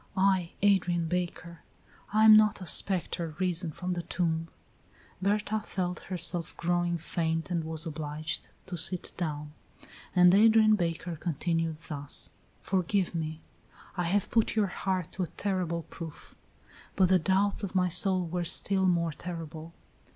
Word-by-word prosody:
"I, 190 Hz, -3 st, +2 dB
Adrian 180 Hz, -4 st, +3 dB
Baker. 175 Hz, -1 st, -4 dB, 0.5 s
I 215 Hz, +1 st, +4 dB
am 215 Hz, -1 st, +10 dB
not 215 Hz, -1 st, +4 dB
a 185 Hz, -, -7 dB
spectre 170 Hz, -3 st, +2 dB
risen 180 Hz, -2 st, -1 dB
from 180 Hz, +4 st, -5 dB
the 175 Hz, -1 st, -2 dB
tomb." 165 Hz, -1 st, -1 dB, 0.7 s
Berta 210 Hz, +2 st, 0 dB
felt 180 Hz, -4 st, -3 dB
herself 175 Hz, -2 st, 0 dB
growing 175 Hz, 0 st, 0 dB
faint 165 Hz, 0 st, -2 dB
and 170 Hz, -2 st, 0 dB
was 160 Hz, +1 st, -1 dB
obliged 155 Hz, -1 st, -4 dB, 0.2 s
to 180 Hz, -, -6 dB
sit 175 Hz, +2 st, -2 dB
down; 150 Hz, -4 st, -4 dB, 0.6 s
and 180 Hz, 0 st, +6 dB
Adrian 215 Hz, +1 st, +6 dB
Baker 170 Hz, -2 st, -3 dB
continued 165 Hz, 0 st, -1 dB
thus: 145 Hz, -2 st, -4 dB, 0.3 s
"Forgive 185 Hz, 0 st, 0 dB
me. 160 Hz, -1 st, -4 dB, 0.5 s
I 180 Hz, -2 st, -1 dB
have 195 Hz, +3 st, 0 dB
put 225 Hz, -1 st, +2 dB
your 215 Hz, -2 st, +3 dB
heart 185 Hz, -4 st, -2 dB
to 190 Hz, -, -5 dB
a 180 Hz, -, -1 dB
terrible 180 Hz, -4 st, -1 dB
proof, 165 Hz, -2 st, -10 dB, 0.6 s
but 185 Hz, -2 st, +3 dB
the 185 Hz, -1 st, +5 dB
doubts 195 Hz, +5 st, +1 dB
of 195 Hz, -1 st, -5 dB
my 180 Hz, -1 st, +3 dB
soul 185 Hz, +1 st, +1 dB
were 175 Hz, +1 st, -3 dB
still 190 Hz, +3 st, +4 dB
more 170 Hz, -2 st, +1 dB
terrible. 165 Hz, -1 st, -7 dB
175 Hz, 145 wpm, -29 LUFS, 165-190 Hz, 0.7 s, am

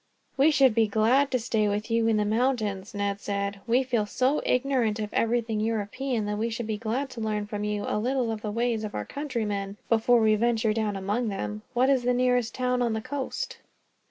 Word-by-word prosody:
"We 280 Hz, +3 st, +5 dB
should 270 Hz, -5 st, +4 dB
be 225 Hz, -1 st, +3 dB
glad 225 Hz, +7 st, +3 dB
of 270 Hz, -, -12 dB
a -, -, +2 dB
stay 220 Hz, -3 st, +1 dB
with 210 Hz, +3 st, -2 dB
you 230 Hz, 0 st, +2 dB
in 225 Hz, -1 st, +3 dB
the 210 Hz, -, +1 dB
mountains," 215 Hz, -3 st, -1 dB
Ned 200 Hz, 0 st, -1 dB
said. 200 Hz, 0 st, -3 dB
"We 245 Hz, +3 st, +3 dB
feel 235 Hz, -5 st, 0 dB
so 260 Hz, +7 st, +1 dB
ignorant 250 Hz, -4 st, +1 dB
of 210 Hz, -1 st, -4 dB
everything 230 Hz, -1 st, 0 dB
European 225 Hz, +2 st, -1 dB
that 210 Hz, 0 st, -2 dB
we 230 Hz, +2 st, 0 dB
should 230 Hz, +1 st, -4 dB
be 215 Hz, -1 st, -3 dB
glad 240 Hz, +5 st, -2 dB
to 230 Hz, -, -7 dB
learn, 210 Hz, -1 st, -1 dB
from 210 Hz, 0 st, -4 dB
you, 210 Hz, 0 st, -2 dB
a -, -, 0 dB
little 250 Hz, 0 st, 0 dB
of 220 Hz, -1 st, -4 dB
the 215 Hz, -, -3 dB
ways 230 Hz, 0 st, -1 dB
of 210 Hz, -, -5 dB
our 105 Hz, -, -3 dB
countrymen 210 Hz, -8 st, -3 dB
before 230 Hz, +1 st, +4 dB
we 220 Hz, -1 st, +4 dB
venture 225 Hz, 0 st, +2 dB
down 215 Hz, -2 st, -1 dB
among 205 Hz, +5 st, -1 dB
them. 105 Hz, -, -4 dB
What 255 Hz, +3 st, +4 dB
is 265 Hz, -2 st, +3 dB
the 245 Hz, 0 st, +1 dB
nearest 250 Hz, -2 st, +1 dB
town 250 Hz, -1 st, 0 dB
on 235 Hz, -2 st, +1 dB
the 220 Hz, -, -2 dB
coast?" 285 Hz, -, -4 dB
225 Hz, 220 wpm, -27 LUFS, 210-250 Hz, -, We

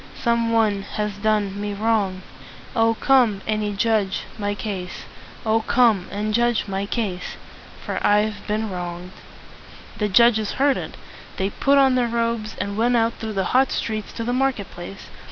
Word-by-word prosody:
Some 235 Hz, -1 st, +1 dB
one 215 Hz, -3 st, +2 dB, 0.2 s
has 210 Hz, 0 st, 0 dB
done 205 Hz, -2 st, 0 dB
me 205 Hz, 0 st, -3 dB
wrong! 205 Hz, -3 st, 0 dB, 0.5 s
Oh! 225 Hz, 0 st, +3 dB
come 240 Hz, -6 st, +3 dB
and 210 Hz, -1 st, -1 dB
judge 210 Hz, -3 st, +1 dB, 0.2 s
my 205 Hz, 0 st, -1 dB
case! 190 Hz, -4 st, -5 dB, 0.4 s
Oh! 220 Hz, +1 st, +2 dB
come 220 Hz, -5 st, +3 dB
and 210 Hz, +1 st, -2 dB
judge 240 Hz, -1 st, +2 dB
my 195 Hz, 0 st, -2 dB
case! 200 Hz, -6 st, -3 dB, 0.5 s
For -, -, -2 dB
I've 210 Hz, +1 st, +3 dB
been 215 Hz, 0 st, -1 dB
wronged!" 175 Hz, 0 st, -5 dB, 0.9 s
The 210 Hz, -1 st, +1 dB
judges 220 Hz, +1 st, +4 dB
heard 275 Hz, 0 st, +2 dB
it. -, -, -6 dB, 0.4 s
They 190 Hz, +1 st, -1 dB
put 280 Hz, +6 st, +2 dB
on 270 Hz, -1 st, +5 dB
their 250 Hz, -1 st, +2 dB
robes, 230 Hz, -2 st, -1 dB
and 200 Hz, 0 st, -3 dB
went 240 Hz, +1 st, +3 dB
out 230 Hz, 0 st, +2 dB
through 220 Hz, -1 st, -4 dB
the 190 Hz, -2 st, -1 dB
hot 265 Hz, +1 st, +4 dB
streets 215 Hz, -2 st, -3 dB
to 230 Hz, -, -4 dB
the 245 Hz, +2 st, -1 dB
market 255 Hz, -6 st, 0 dB
place. 175 Hz, +2 st, -9 dB
215 Hz, 165 wpm, -22 LUFS, 200-235 Hz, 0.9 s, on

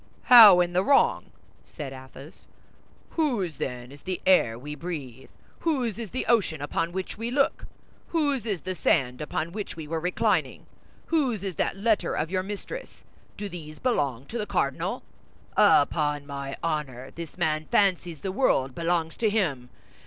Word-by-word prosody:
"How, 215 Hz, -7 st, +10 dB
in 175 Hz, 0 st, -1 dB
the 180 Hz, +1 st, +2 dB
wrong?" 280 Hz, -, +3 dB, 0.4 s
said 135 Hz, -3 st, -8 dB
Athos. 135 Hz, +5 st, -13 dB, 0.6 s
"Whose, 230 Hz, -, -1 dB
then, 125 Hz, 0 st, -5 dB
is 140 Hz, 0 st, -13 dB
the 185 Hz, -1 st, -4 dB
air 120 Hz, -12 st, +4 dB
we 145 Hz, +5 st, -7 dB
breathe? 145 Hz, -6 st, -7 dB, 0.3 s
Whose 255 Hz, -, -1 dB
is 225 Hz, -4 st, -5 dB
the 255 Hz, -, -3 dB
ocean 205 Hz, -9 st, +2 dB
upon 165 Hz, +4 st, -2 dB
which 190 Hz, +3 st, -5 dB
we 230 Hz, +1 st, -3 dB
look? 275 Hz, +2 st, 0 dB, 0.4 s
Whose 285 Hz, -8 st, 0 dB
is 195 Hz, -7 st, -2 dB
the 185 Hz, -, -4 dB
sand 130 Hz, -7 st, +1 dB
upon 155 Hz, +2 st, -3 dB
which 205 Hz, +2 st, -5 dB
we 160 Hz, -2 st, -7 dB
were 165 Hz, +1 st, -2 dB
reclining? 180 Hz, +3 st, 0 dB, 0.4 s
Whose 265 Hz, -, 0 dB
is 190 Hz, -3 st, -4 dB
that -, -, 0 dB
letter 215 Hz, +1 st, +1 dB
of 160 Hz, +3 st, -2 dB
your 185 Hz, -1 st, +1 dB
mistress? 205 Hz, -, -7 dB, 0.3 s
Do 205 Hz, -, -4 dB
these 155 Hz, -5 st, -9 dB
belong 140 Hz, -, -1 dB
to 235 Hz, +10 st, -5 dB
the 210 Hz, -, -3 dB
cardinal? 140 Hz, -8 st, -1 dB, 0.5 s
Upon 145 Hz, 0 st, +3 dB
my 140 Hz, -1 st, -6 dB
honor, 140 Hz, -6 st, -3 dB
this 170 Hz, -1 st, -9 dB
man 155 Hz, -3 st, 0 dB
fancies 180 Hz, -4 st, +1 dB
the 190 Hz, -, -3 dB
world 135 Hz, -, +1 dB
belongs 165 Hz, 0 st, -1 dB
to 225 Hz, -, +2 dB
him. 150 Hz, -, -1 dB
175 Hz, 160 wpm, -26 LUFS, 145-210 Hz, 0.6 s, How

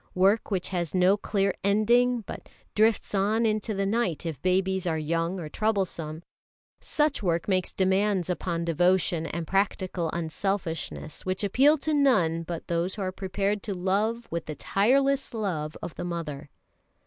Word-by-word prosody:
Work 195 Hz, +4 st, +3 dB
which 190 Hz, -4 st, -1 dB
has 175 Hz, -2 st, -2 dB
no 185 Hz, +2 st, +5 dB
clear 200 Hz, -2 st, 0 dB
ending, 235 Hz, +4 st, +3 dB
but 205 Hz, -, -9 dB, 0.2 s
drifts 220 Hz, 0 st, +2 dB
on 210 Hz, +4 st, +2 dB
into 215 Hz, 0 st, 0 dB
the 195 Hz, 0 st, 0 dB
night 195 Hz, -6 st, 0 dB
if 160 Hz, -5 st, -4 dB
babies 190 Hz, 0 st, +1 dB
are 160 Hz, -2 st, 0 dB
young 165 Hz, +4 st, -1 dB
or 160 Hz, -, -5 dB
troublesome 170 Hz, -5 st, -2 dB, 0.6 s
such 300 Hz, -4 st, 0 dB
work 170 Hz, -4 st, 0 dB
makes 185 Hz, -3 st, +1 dB
demands 190 Hz, -1 st, +1 dB
upon 170 Hz, -2 st, -2 dB
devotion 170 Hz, 0 st, +2 dB
and 170 Hz, 0 st, -4 dB
practical 190 Hz, -2 st, 0 dB
unselfishness 165 Hz, -2 st, -3 dB
which 185 Hz, +3 st, -2 dB
appeal 270 Hz, +10 st, +4 dB
to 310 Hz, +2 st, -2 dB
none 210 Hz, -, +3 dB
but 165 Hz, 0 st, -6 dB
those 170 Hz, +2 st, -1 dB
who 205 Hz, -, -4 dB
are 185 Hz, -, -1 dB
prepared 195 Hz, +2 st, -2 dB
to 200 Hz, -1 st, -4 dB
love 210 Hz, +6 st, 0 dB
with 170 Hz, 0 st, -3 dB
the 155 Hz, -, -4 dB
tireless 270 Hz, -, +1 dB
love 160 Hz, -8 st, -3 dB
of 170 Hz, -1 st, -5 dB
the -, -, -6 dB
mother. 160 Hz, -5 st, -5 dB
190 Hz, 160 wpm, -27 LUFS, 170-210 Hz, 0.6 s, no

